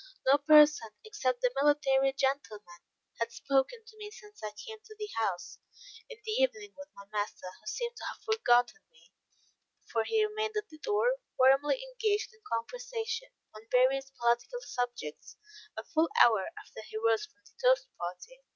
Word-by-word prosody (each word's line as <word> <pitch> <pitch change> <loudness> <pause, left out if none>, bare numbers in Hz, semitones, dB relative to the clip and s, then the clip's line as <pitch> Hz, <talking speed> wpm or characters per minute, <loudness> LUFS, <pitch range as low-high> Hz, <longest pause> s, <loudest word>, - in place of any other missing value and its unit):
No 275 +2 +5
person, 300 -5 +6 0.2
except 260 - -1
the 250 -1 +2
military 275 -2 +3
gentleman, 215 -10 -3 0.4
had 230 0 -1
spoken 275 - 0
to 440 -1 -16
me 420 -1 -7
since 420 -1 -15
I 215 - -2
came 430 - -10
to 435 - -14
the 420 -1 -5
house 185 -5 -2 0.5
in - - -9
the 435 - -3
evening 420 -5 0
with 285 +1 -11
my 200 - -12
master, 205 -2 -3
who 215 - -18
seemed 475 - -3
to - - -7
have - - -7
forgotten 440 - +2
me; 485 - -24 0.7
for 225 - -1
he 435 - +2
remained 430 0 -3
at 425 0 -3
the 310 - -14
door, 460 +6 +1 0.2
warmly 270 - +4
engaged 450 -3 -1
in 460 - -24
conversation, 470 - -3 0.2
on 215 +1 -13
various 265 +2 +3
political 240 - 0
subjects, 245 - -5 0.4
a - - -4
full 325 0 +1
hour 220 -5 +4
after - - -10
he 220 0 -8
rose 225 +6 +1
from 325 -1 -34
the - - -21
toast - - +4
party. 180 - -7
295 Hz, 170 wpm, -31 LUFS, -, 0.7 s, person